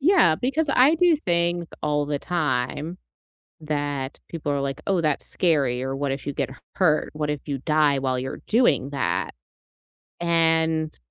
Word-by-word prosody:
Yeah, 290 - +5
because 285 - 0
I 270 +6 +5
do 340 -1 +4
things 175 - 0 0.2
all 145 -1 0
the 145 -1 -1
time 155 +1 -2 0.6
that 145 -3 -3
people 150 -3 -3
are 140 - 0
like, 140 +2 -3
"Oh, 190 -3 +2
that's 150 -3 0
scary," 140 -8 +1
or 135 +1 -3
"What 140 0 -1
if 135 +1 -5
you 145 - -2
get 130 - -2
h - - -11 0.2
hurt? 160 -5 +2
What 150 -1 -2
if 145 - -4
you 140 -2 -2
die 150 -1 +2
while 130 -1 -1
you're 130 +1 -5
doing 220 - +3
that?" 90 - -1 0.9
and 160 -2 +1
150 Hz, 165 wpm, -24 LUFS, 140-170 Hz, 0.9 s, Yeah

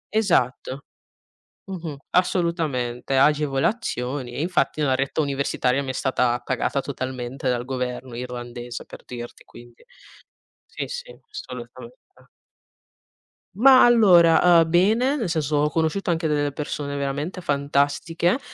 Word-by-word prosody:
Esatto, 140 - 0 0.8
mh-mh, 170 -6 -6
assolutamente, 155 -9 0
agevolazioni 140 - 0
e 130 - -5
infatti 165 -3 0
la 135 -3 +2
retta 135 +3 -1
universitaria 140 -1 0
mi 130 - -5
è - - 0
stata 125 -1 +1
pagata 130 +2 -1
totalmente 130 -1 -5
dal 120 -1 0
governo 125 -1 -4
irlandese, 120 -1 -7
per - - -13
dirti 120 -1 -9
quindi. 120 0 -16 0.8
Sì - - -6
sì, - - -7
assolutamente. 425 +3 -9 1.6
Ma 255 +4 +7
allora, 175 -7 +6
uhm, 165 - 0
bene, 220 - +3
nel 230 -10 -2
senso, 155 -3 0
ho 150 +1 +2
conosciuto 165 +5 -1
anche 165 -1 0
delle 145 -1 0
persone 145 0 -4
veramente 140 +6 -3
fantastiche, 145 - 0
145 Hz, 115 wpm, -23 LUFS, 130-175 Hz, 1.6 s, Ma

